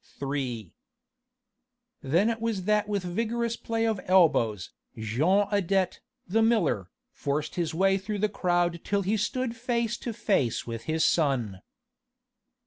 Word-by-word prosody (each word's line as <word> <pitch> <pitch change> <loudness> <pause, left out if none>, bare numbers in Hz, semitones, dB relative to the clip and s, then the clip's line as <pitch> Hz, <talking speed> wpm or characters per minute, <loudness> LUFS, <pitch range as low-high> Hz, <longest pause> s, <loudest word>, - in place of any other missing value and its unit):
III 135 -5 -3 1.3
Then 170 +11 +2
it 225 -1 -5
was 225 -5 -1
that 210 +1 +2
with 200 -2 -1
vigorous 230 +5 -1
play 225 -1 -2
of 220 -2 +1
the - - -11
elbows, 135 - +3 0.3
Jean 150 - +2
Adet, 195 -2 +1 0.3
the 220 +5 +2
miller, 190 - +2 0.2
forced 145 +2 -2
his 165 -2 -2
way 195 +2 +3
through 205 +2 -4
the 210 +2 +2
crowd 175 -4 0
till 200 -1 0
he 200 +4 +1
stood 230 +3 -1
face 235 -1 -1
to 240 - -5
face 205 - 0
with 115 -1 -6
his 160 0 +1
son. 125 - +1
190 Hz, 140 wpm, -27 LUFS, 145-220 Hz, 1.3 s, elbows